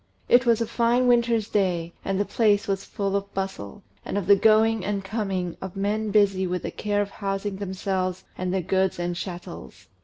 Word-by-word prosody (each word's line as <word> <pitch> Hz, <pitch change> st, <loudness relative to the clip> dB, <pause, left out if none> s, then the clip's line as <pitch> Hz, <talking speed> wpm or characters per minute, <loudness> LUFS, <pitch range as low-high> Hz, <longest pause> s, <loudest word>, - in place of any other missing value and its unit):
It 245 Hz, 0 st, +5 dB
was 230 Hz, -1 st, +4 dB
a -, -, +2 dB
fine 235 Hz, +2 st, +2 dB
winter's 235 Hz, -3 st, +3 dB
day, 175 Hz, -5 st, 0 dB
and 195 Hz, 0 st, -1 dB
the 205 Hz, -, +1 dB
place 210 Hz, -2 st, +2 dB
was 195 Hz, -1 st, -1 dB
full 200 Hz, -2 st, -2 dB
of 200 Hz, 0 st, -2 dB
bustle, 190 Hz, -, -5 dB, 0.2 s
and -, -, -3 dB
of 200 Hz, -, -1 dB
the 200 Hz, +2 st, +7 dB
going 220 Hz, 0 st, +4 dB
and 200 Hz, 0 st, -2 dB
coming 195 Hz, -4 st, -2 dB
of 190 Hz, -1 st, -6 dB
men 210 Hz, +2 st, -1 dB
busy 195 Hz, -2 st, +3 dB
with 180 Hz, -1 st, -3 dB
the -, -, -3 dB
care 205 Hz, -1 st, 0 dB
of 200 Hz, -, -9 dB
housing 195 Hz, -1 st, -3 dB
themselves 190 Hz, -1 st, -2 dB
and 185 Hz, 0 st, -3 dB
their 190 Hz, -1 st, 0 dB
goods 190 Hz, +1 st, +1 dB
and 175 Hz, 0 st, -2 dB
chattels. 175 Hz, -, -8 dB
195 Hz, 195 wpm, -25 LUFS, 185-210 Hz, 0.2 s, the